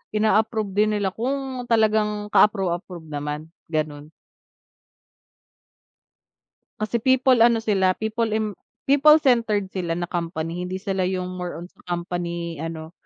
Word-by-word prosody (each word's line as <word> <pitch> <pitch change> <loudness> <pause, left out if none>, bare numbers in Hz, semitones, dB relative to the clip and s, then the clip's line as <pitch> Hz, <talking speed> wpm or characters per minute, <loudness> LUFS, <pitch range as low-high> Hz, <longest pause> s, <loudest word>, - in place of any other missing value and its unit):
ina-approve 215 -1 +1
din 210 +2 +2
nila 200 -2 0
kung 260 +3 -3
talagang 215 -2 +2
ka-approve-approve 180 -4 +1
naman 150 +1 -4 0.2
gano'n. 150 -1 -3 2.7
Kasi 215 +2 -1
people 260 +1 +4
ano 230 -1 +4
sila 190 -4 +2
people 220 +1 -1
im 215 -1 -1 0.3
people 290 +2 +6
centered 230 -9 +1
sila 175 -3 -2
na 175 +1 -2
company, 170 -1 -3
hindi 185 - -4
sila 190 -2 -1
yung 185 -1 -3
more 180 -1 -4
on 170 +1 -8
sa - - -34
company 170 -2 -3
ano 160 0 -6
195 Hz, 125 wpm, -23 LUFS, 170-220 Hz, 2.7 s, people